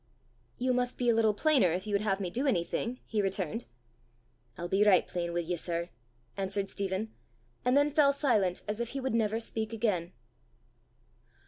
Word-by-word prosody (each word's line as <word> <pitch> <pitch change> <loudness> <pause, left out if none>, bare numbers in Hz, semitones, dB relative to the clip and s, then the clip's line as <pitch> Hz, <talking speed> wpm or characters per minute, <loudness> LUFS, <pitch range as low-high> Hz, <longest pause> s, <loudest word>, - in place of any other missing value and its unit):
"You 255 +1 +1
must 250 0 -1
be 245 -1 +1
a - - +5
little 220 -2 +3
plainer 270 - +4
if 185 +4 -2
you 210 - -4
would 200 - +2
have 200 -2 0
me 185 -3 -3
do 260 +9 -1
anything," 230 +3 -1
he 215 -2 0
returned. 195 +2 -2 0.9
"I'll 175 - -4
be 195 +3 +3
richt 200 -3 +5
plain 170 -1 -2
wi' 175 0 0
ye, 175 +1 -2
sir," 170 0 -3 0.5
answered 195 0 -1
Stephen, 200 +2 -3 0.5
and 250 +2 +3
then 290 +1 +3
fell 290 -2 +5
silent 225 - +1
as 210 +2 -3
if 235 -1 -2
he - - -1
would 265 -3 -2
never 225 -1 +1
speak 220 -1 -3
again. 195 -7 0
210 Hz, 185 wpm, -30 LUFS, 185-240 Hz, 0.9 s, a